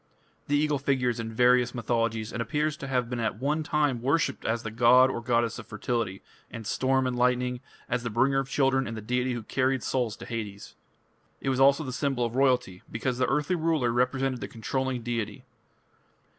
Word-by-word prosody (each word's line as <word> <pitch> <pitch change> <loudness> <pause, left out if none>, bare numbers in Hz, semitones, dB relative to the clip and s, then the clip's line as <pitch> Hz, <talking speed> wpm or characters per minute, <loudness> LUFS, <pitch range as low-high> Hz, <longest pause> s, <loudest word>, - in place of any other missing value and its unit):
" - - -38
The 145 - +2
eagle 150 -1 +1
figures 125 -3 0
in 115 0 -4
various 125 +1 +3
mythologies, 115 -1 -1
and 115 - -2
appears 150 +6 -1
to 135 - -7
have 125 -3 0
been 120 0 -4
at 110 -2 -1
one 150 +4 0
time 150 -5 0
worshipped 140 +6 0
as 115 +1 -1
the 110 - -4
god 125 +3 +5
or 120 - -4
goddess 115 -1 0
of - - -10
fertility, 115 -6 -3 0.3
and 115 -1 -8
storm 130 +4 +1
and 125 -1 -1
lightning, 125 0 +1 0.3
as 125 0 -1
the 120 - -3
bringer 135 +5 +2
of 135 0 -3
children, 135 -1 +2
and 115 - -5
the - - -5
deity 125 +3 -1
who 120 -2 -4
carried 130 +3 0
souls 120 -5 -1
to - - -10
Hades. 105 -4 -6 0.7
It 135 - -2
was 130 -1 0
also 140 +3 +5
the 130 -3 -5
symbol 130 -2 0
of 115 0 -4
royalty, 125 -9 +1
because 120 +2 -2
the 130 - +2
earthly 150 +5 +1
ruler 160 -7 +1
represented 125 +1 0
the - - -4
controlling 130 +1 -3
deity. 115 -3 -3
125 Hz, 200 wpm, -27 LUFS, 115-135 Hz, 0.7 s, god